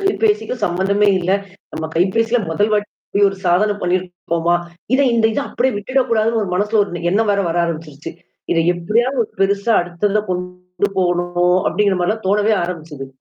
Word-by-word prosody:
கைபேசிக்கும் 225 - 0
சம்மந்தமே 200 +3 +1
இல்ல. 180 +1 -1 0.4
நம்ம 160 0 -4
கைபேசியில 225 +7 +2
முதல் 205 +6 +1
வாட்டிப்படி 205 -1 -2
ஒரு 195 - -6
சாதன 200 +4 +2
பண்ணிருக்கோமா? 175 -2 0 0.4
இத 270 - +3
இந்த 230 -1 +2
இத 250 - -1
அப்படியியே 255 -3 0
விட்டுடக்கூடாதுன்னு 230 -1 +1
ஒரு 195 - -4
மனசுல 210 +3 +1
ஒரு 175 -3 -7
எண்ணம் 215 +1 +2
வேற 200 - +1
வர 165 +1 -1
ஆரம்பிச்சருச்சு. 155 -3 -6 0.4
இத 165 - +1 0.2
எப்படியாவது 235 +9 0
ஒரு - - -16
பெருசா 200 +3 +2
அடுத்தத 185 +4 -1
கொண்டு 180 +2 -3
போகணும் 175 0 +1
அப்படிங்கிற 205 -2 +1
மாரிலாம் 215 +4 -1
தோணவே 210 +2 +3
ஆரம்பிச்சது. 160 -6 -6
195 Hz, 150 wpm, -18 LUFS, 175-215 Hz, 0.4 s, இத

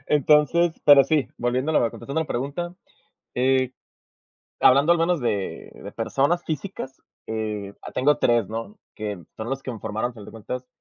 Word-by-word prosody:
Entonces, 150 +3 +3
pero 140 -2 +8
sí, 155 -4 +1
volviendo 125 +5 0
a - - +4
la 115 - +1
contestando 150 +4 -4
la 160 - -2
pregunta, 145 +8 -3 0.6
eh, 130 0 +2 0.9
hablando 140 +6 +6
al 175 - +4
menos 170 0 +2
de 100 -5 -2
de - - -10
personas 165 +6 0
físicas, 155 -4 -5 0.3
eh, 105 -3 -4
ah, - - -8
tengo 140 +1 +2
3, 120 -4 +2
¿no?, 115 - -6 0.2
que 105 -4 -5 0.2
son 110 +2 -5
los 135 0 -3
que 130 - -4
me 110 - -8
formaron, 110 +4 -2
al - - -13
final 105 -3 -11
de - - -11
cuentas, 125 +3 -6
130 Hz, 180 wpm, -24 LUFS, 115-150 Hz, 0.9 s, pero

